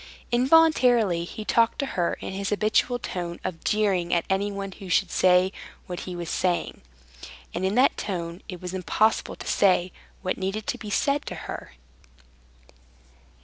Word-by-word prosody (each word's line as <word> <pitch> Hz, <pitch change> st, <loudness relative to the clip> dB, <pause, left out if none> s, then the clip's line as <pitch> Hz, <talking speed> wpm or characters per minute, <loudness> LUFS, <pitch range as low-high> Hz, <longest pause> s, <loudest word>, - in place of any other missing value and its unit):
Involuntarily 245 Hz, -, +4 dB
he 215 Hz, +4 st, -7 dB
talked 230 Hz, +1 st, +3 dB
to 280 Hz, -, -1 dB
her 175 Hz, -2 st, 0 dB
in -, -, -5 dB
his 195 Hz, +1 st, -3 dB
habitual 215 Hz, +4 st, +2 dB
tone 175 Hz, -7 st, -5 dB
of 180 Hz, -3 st, -5 dB
jeering 195 Hz, -5 st, +1 dB
at 170 Hz, -, 0 dB
anyone 200 Hz, 0 st, -1 dB
who 190 Hz, -1 st, -10 dB
should 180 Hz, 0 st, +2 dB
say 185 Hz, 0 st, +4 dB, 0.3 s
what 180 Hz, -2 st, -5 dB
he 180 Hz, -, -5 dB
was 175 Hz, -1 st, -5 dB
saying. 175 Hz, +1 st, -1 dB, 0.7 s
And 175 Hz, -, -3 dB
in 190 Hz, +2 st, +1 dB
that 255 Hz, +3 st, +4 dB
tone 170 Hz, -2 st, -4 dB
it 180 Hz, -2 st, -6 dB
was 180 Hz, +1 st, -6 dB
impossible 210 Hz, +4 st, +1 dB
to -, -, -10 dB
say 185 Hz, -2 st, +3 dB, 0.3 s
what 185 Hz, -, -2 dB
needed 195 Hz, +3 st, -3 dB
to -, -, -3 dB
be 210 Hz, -, -7 dB
said 280 Hz, +7 st, +1 dB
to -, -, -4 dB
her. -, -, -7 dB
190 Hz, 160 wpm, -25 LUFS, 180-215 Hz, 0.7 s, Involuntarily